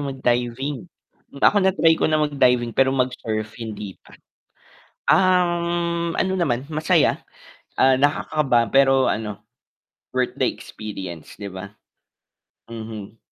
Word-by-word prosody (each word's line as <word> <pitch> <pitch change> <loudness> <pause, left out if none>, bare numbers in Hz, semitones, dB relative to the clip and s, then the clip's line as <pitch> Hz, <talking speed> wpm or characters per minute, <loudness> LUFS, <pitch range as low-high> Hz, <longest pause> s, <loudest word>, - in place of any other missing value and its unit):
mag-diving. 135 +3 -2 0.5
Ako 205 - +5
na-try 190 -4 +4
ko - - +2
na 155 -1 +2
mag-diving 125 -5 +2
pero 135 +2 +3
mag-surf 115 -4 -2
hindi 105 -3 -6
pa. - - -18 0.9
Um, 170 -2 +2
ano 190 - 0
naman 140 -5 -1
masaya, 155 0 +2 0.6
ah, 130 0 +5
nakakaba 140 -4 +1
pero 135 -1 +4
ano, 105 -1 -3 0.7
worth - - -1
the - - +1
experience, 95 -6 -9
di 100 - -6
ba? 95 +1 -8 1.0
Mhm. 110 -2 -8
130 Hz, 110 wpm, -22 LUFS, 110-155 Hz, 1.0 s, Ako